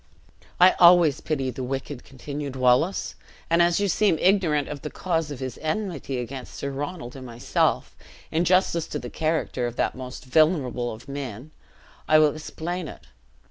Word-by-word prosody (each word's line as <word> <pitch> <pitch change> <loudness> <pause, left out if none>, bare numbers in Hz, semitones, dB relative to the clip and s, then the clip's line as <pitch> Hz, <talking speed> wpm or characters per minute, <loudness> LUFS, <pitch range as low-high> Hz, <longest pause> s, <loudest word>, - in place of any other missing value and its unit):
"I 180 +1 +8
always 170 -4 +6
pity 135 -4 -2
the 130 +1 -6
wicked," 135 0 -5
continued 140 +1 -7
Wallace; 130 +9 +2 0.4
"and 170 +1 +5
as 170 +1 +3
you 200 - +1
seem 200 -3 +2
ignorant 175 -7 +2
of 145 -2 -6
the 150 - -5
cause 165 -3 -2
of 145 - -6
his 130 -3 -5
enmity 155 -5 -3
against 125 +1 -6
Sir 140 - -4
Ronald 145 -1 -5
and 135 - -8
myself, 120 -1 -1 0.4
in 165 +2 +1
justice 175 -2 +2
to - - -4
the 125 -4 -7
character 155 -6 -1
of 120 - -6
that - - 0
most 130 0 -8
venerable 130 -4 +2
of 110 +4 -11
men, 135 -1 -6 0.6
I 155 - +6
will 155 -2 +5
explain 165 +2 -5
it. 60 - -11
145 Hz, 170 wpm, -25 LUFS, 130-170 Hz, 0.6 s, I